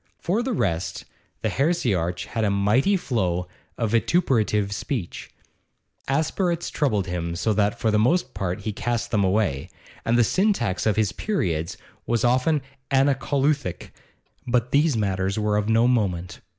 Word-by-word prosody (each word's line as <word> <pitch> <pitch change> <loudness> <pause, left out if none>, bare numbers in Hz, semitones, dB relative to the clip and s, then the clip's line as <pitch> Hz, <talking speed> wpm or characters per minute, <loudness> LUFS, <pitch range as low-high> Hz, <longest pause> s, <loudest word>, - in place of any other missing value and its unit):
For 195 +7 0
the 260 +2 -2
rest, 85 - -2 0.4
the - - +1
heresiarch 100 - 0
had 115 -1 -3
a 105 - +2
mighty 105 - +2
flow 90 - -1 0.3
of 115 -3 -1
vituperative 110 - +2
speech. 100 -2 -4 0.8
Aspirates 170 +5 0
troubled 110 - 0
him, 85 -2 -3
so 110 +5 0
that 105 0 +1
for 110 - +1
the 105 - +3
most 130 +3 +2
part 95 0 -3
he 110 +1 -3
cast 120 +2 -2
them 105 -2 +2
away, 95 -6 0 0.3
and 115 +1 +2
the 120 - +5
syntax 120 - +1
of 105 - +2
his 105 -3 +1
periods 85 - -2 0.3
was 120 -1 +1
often 130 +4 +2 0.3
anacoluthic; 135 - +1 0.6
but 120 0 +1
these 145 -2 +3
matters 95 -1 -1
were 105 -1 +1
of 105 +1 0
no 115 +2 +4
moment. 95 -8 -1
110 Hz, 150 wpm, -24 LUFS, 95-135 Hz, 0.8 s, the